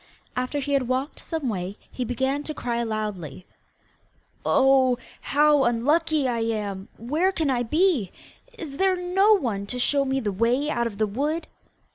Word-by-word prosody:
After 255 +3 -2
he 285 0 -2
had 270 -3 +2
walked 260 +4 -2
some 320 -5 -4
way 195 -2 -3
he 255 - -3
began 265 +4 -1
to 310 - -5
cry 235 -2 -2
loudly: 210 -7 -4 1.0
'Oh, 260 -2 +4 0.2
how 295 0 +4
unlucky 290 +5 +2
I 240 -2 0
am! 210 -4 -2
Where 305 - +1
can 320 -7 0
I 245 -2 +1
be? 300 - +2 0.5
Is 300 -9 -6
there 380 +1 +3
no 370 +4 +3
one 225 - -1
to 250 - -4
show 280 +3 +2
me 270 0 0
the 215 -5 -1
way 240 +9 +1
out 235 -3 0
of 205 -3 -8
the 215 - +2
wood? 290 +10 -2
260 Hz, 165 wpm, -25 LUFS, 230-300 Hz, 1.0 s, Oh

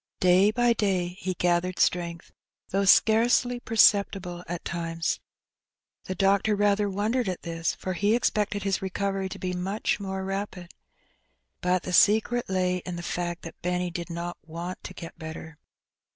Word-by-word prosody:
Day 185 +2 +5
by 240 +2 +3
day 190 -5 0
he 185 -1 -3
gathered 175 +1 +1
strength, 170 -1 0 0.4
though 195 +1 +1
scarcely 240 +4 +4
per 225 -1 -6
ceptible 195 -4 +3
at 175 0 -5
times. 165 -1 -2 0.9
The 185 - -4
doctor 200 +2 +3
rather 205 0 +2
wondered 210 +4 0
at 180 - -5
this, 165 -1 -2
for 185 - -4
he 205 +5 +2
expected 210 -3 0
his 195 -1 0
recovery 195 0 -2
to - - -7
be 180 -1 -3
much 195 +4 -1
more 190 -1 -4
rapid. 195 -2 -5 0.9
But 180 0 +1
the 180 - -4
secret 220 +4 +4
lay 185 -1 +1
in 180 0 -6
the 170 - -6
fact 175 0 -3
that 165 - -10
Benny 180 0 -1
did 170 0 -5
not 170 +1 -5
want 170 +3 -7
to - - -8
get 165 -1 -9
better. 160 -1 -8
185 Hz, 160 wpm, -27 LUFS, 175-205 Hz, 0.9 s, Day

